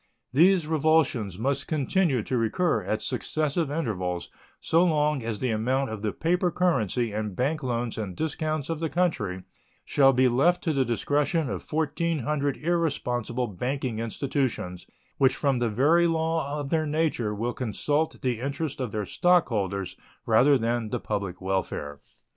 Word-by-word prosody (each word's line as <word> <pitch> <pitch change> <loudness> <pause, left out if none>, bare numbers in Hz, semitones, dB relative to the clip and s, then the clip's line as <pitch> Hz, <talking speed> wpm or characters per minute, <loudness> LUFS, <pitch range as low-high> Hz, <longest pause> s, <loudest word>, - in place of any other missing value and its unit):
These 175 +4 +5
revulsions 155 - +1
must 135 +5 -1
continue 155 - +1
to 130 - -2
recur 115 +3 +1
at 110 +3 -2
successive 155 0 -1
intervals 95 - -3 0.3
so 165 +2 +3
long 150 -4 +2
as 115 -2 -3
the 125 +3 -1
amount 130 +4 0
of 110 -2 -5
the 105 -1 -1
paper 175 - +1
currency 125 - +1
and 105 -2 -3
bank 145 - 0
loans 120 -3 -2
and 100 -5 -4
discounts 155 - -2
of 165 -2 -3
the 165 -1 -1
country 105 - -1 0.4
shall 135 -1 +5
be 130 0 +4
left 170 +9 +2
to 160 - +1
the 135 -2 +2
discretion 145 +5 0
of - - -6
1,400 150 -2 0
irresponsible 130 -8 -1
banking 125 +3 -3
institutions, 115 - -2 0.3
which 130 -1 +4
from 140 -4 +1
the 120 -1 +1
very 155 +10 +4
law 160 -3 -1
of 140 -1 -5
their 160 -2 +1
nature 145 -9 0
will 120 +4 -2
consult 145 +6 -1
the 125 -3 0
interest 140 +2 -3
of 125 -5 -3
their 105 -1 -2
stockholders 105 - +1 0.3
rather 130 +6 +5
than 115 -1 -1
the - - -2
public 100 -4 -3
welfare. 95 -6 -3
135 Hz, 155 wpm, -26 LUFS, 110-155 Hz, 0.4 s, These